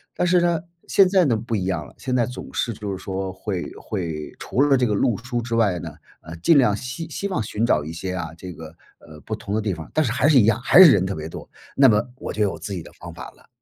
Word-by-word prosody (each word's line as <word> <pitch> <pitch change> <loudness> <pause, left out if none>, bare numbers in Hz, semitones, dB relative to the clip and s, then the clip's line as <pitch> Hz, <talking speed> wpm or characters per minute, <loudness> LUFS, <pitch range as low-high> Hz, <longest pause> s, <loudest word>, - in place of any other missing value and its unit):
但 - - 0
是 180 +1 +4
呢， 170 -2 +2 0.3
现 195 - +5
在 185 -2 +4
呢 125 -6 +2
不 115 +1 -3
一 95 -3 -1
样 85 -5 -2
了， - - -15
现 130 -1 -3
在 120 - +2
总 125 +1 -9
是 120 - -1
就 105 -1 -6
是 95 -1 -6
说 95 -1 -4
会 95 -1 -4
会 80 -7 -5
除 130 - -1
了 140 -1 +4
这 125 -2 +2
个 105 - 0
路 115 0 +1
书 120 +2 -4
之 115 0 -3
外 105 -6 +2
呢， - - -7 0.3
呃， 85 - -9
尽 150 - +4
量 125 -7 +4
希 130 +8 -6
希 200 - -3
望 185 - -2
寻 105 +2 -1
找 75 -10 +2
一 80 - -6
些 90 +3 -5
啊， 85 -2 -4
这 90 0 -8
个， 80 -1 -11 0.3
呃， 75 -1 -14
不 110 - -3
同 100 -1 -6
的 110 - +1
地 105 -3 -1
方， 80 -2 -9
但 155 - +2
是 120 - -1
还 120 - +2
是 145 -4 +6
一 105 - +5
样， 115 +2 +2
还 175 +8 +7
是 165 - +9
人 95 -5 +3
特 95 - -2
别 80 0 -6
多， - - -9 0.3
那 135 -1 +6
么 105 -1 +4
我 - - -6
就 105 - -3
有 100 - -1
自 100 - -6
己 90 - -4
的 - - -13
方 - - -11
法 - - -9
了。 - - -25
105 Hz, 310 characters per minute, -22 LUFS, 95-130 Hz, 0.3 s, 是